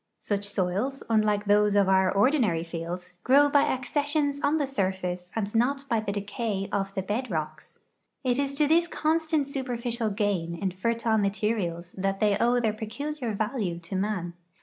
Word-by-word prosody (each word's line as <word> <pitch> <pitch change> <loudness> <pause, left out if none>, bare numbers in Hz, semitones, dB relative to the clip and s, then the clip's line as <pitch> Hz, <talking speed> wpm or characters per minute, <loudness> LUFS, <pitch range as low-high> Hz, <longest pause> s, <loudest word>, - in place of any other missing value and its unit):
Such 205 -1 -2
soils, 200 +9 -1
unlike 210 -2 +2
those 205 0 +4
of 200 -2 +4
our 190 -1 +4
ordinary 210 - +2
fields, 175 +2 -6
grow 285 +3 +5
by 285 0 +5
accessions 285 +2 0
on 295 +2 +2
the 295 - +1
surface 185 -7 -2
and 210 -2 -2
not 275 +5 +1
by 230 -3 +2
the 215 -2 -3
decay 205 0 -3
of 195 -1 -1
the 190 - -1
bed 230 +6 -2
rocks. 155 -3 -5 0.5
It 250 0 +1
is 280 0 -1
to 300 +1 +3
this 335 +3 +4
constant 315 -2 0
superficial 240 -4 -2
gain 195 -5 -1
in 190 +2 -2
fertile 225 +3 0
materials 195 -4 -1
that 195 0 -1
they 210 -1 +3
owe 240 +1 +3
their 220 -3 +1
j)eculiar 230 +2 -4
value 210 -5 -1
to 175 +3 -7
man. 190 -3 -2
215 Hz, 170 wpm, -27 LUFS, 190-260 Hz, 0.5 s, grow